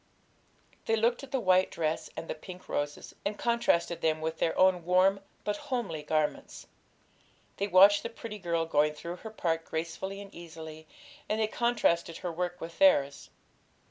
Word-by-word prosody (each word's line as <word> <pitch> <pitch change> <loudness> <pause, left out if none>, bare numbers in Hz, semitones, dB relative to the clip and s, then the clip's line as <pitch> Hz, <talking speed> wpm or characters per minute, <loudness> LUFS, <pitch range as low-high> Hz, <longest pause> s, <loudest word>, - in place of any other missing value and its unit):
They 225 - +3
looked 235 +2 +1
at 275 - -10
the 270 - +1
white 185 -3 +4
dress 160 -1 -2
and 165 - -5
the - - -2
pink 180 +4 -11
roses, 145 0 -3
and 205 +1 -2
contrasted 235 -8 +1
them 155 -1 +1
with 160 +1 -3
their 165 - 0
own 185 -2 +4
warm 185 +3 +4 0.2
but 210 - -1
homely 225 - -2
garments; 155 0 -2 0.9
they 200 - -1
watched 200 +2 +7
the 230 - -4
pretty 225 -2 -8
girl 170 -3 0
going 150 -1 +2
through 170 +4 -6
her 220 - -8
part 165 -6 -1
gracefully 170 +5 -4
and 200 0 -10
easily, 160 -2 -10 0.4
and 215 - 0
they 220 - +3
contrasted 215 -8 +1
her 175 - -4
work 175 +1 -3
with 165 +7 -8
theirs. 140 - +4
180 Hz, 170 wpm, -30 LUFS, 160-205 Hz, 0.9 s, watched